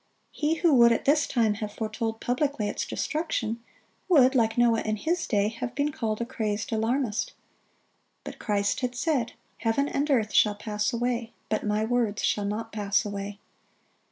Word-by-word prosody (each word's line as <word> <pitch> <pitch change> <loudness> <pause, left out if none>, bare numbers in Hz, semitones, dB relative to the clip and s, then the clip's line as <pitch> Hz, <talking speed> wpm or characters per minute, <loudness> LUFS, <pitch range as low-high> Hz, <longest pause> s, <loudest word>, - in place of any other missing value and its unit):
He 305 +1 0
who 330 -1 +3
would 235 -2 +7
at 230 - 0
this 290 +1 +3
time 225 -4 +2
have 210 -1 -4
foretold 225 0 -3
publicly 250 -3 0
its - - -3
destruction, 235 -8 -2 0.5
would, 270 -7 +6
like 225 -3 +2
Noah 235 -2 +4
in 215 0 -1
his 335 - -1
day, 205 -2 +2
have 240 +2 -6
been 290 +1 +1
called 225 -8 -2
a 235 - -1
crazed 220 -4 -3
alarmist. 225 0 0 0.9
But - - -8
Christ 200 -2 0
had 250 -1 -2
said, 255 -3 0 0.2
"Heaven 230 +5 +1
and 290 +1 -1
earth 225 -7 +2
shall 210 -1 +4
pass 210 0 -2
away, 235 -1 -2 0.2
but 215 - 0
My 210 +1 0
words 230 -3 0
shall 205 - +1
not 220 +2 -3
pass 205 0 0
away." 200 0 -5
230 Hz, 170 wpm, -27 LUFS, 215-260 Hz, 0.9 s, would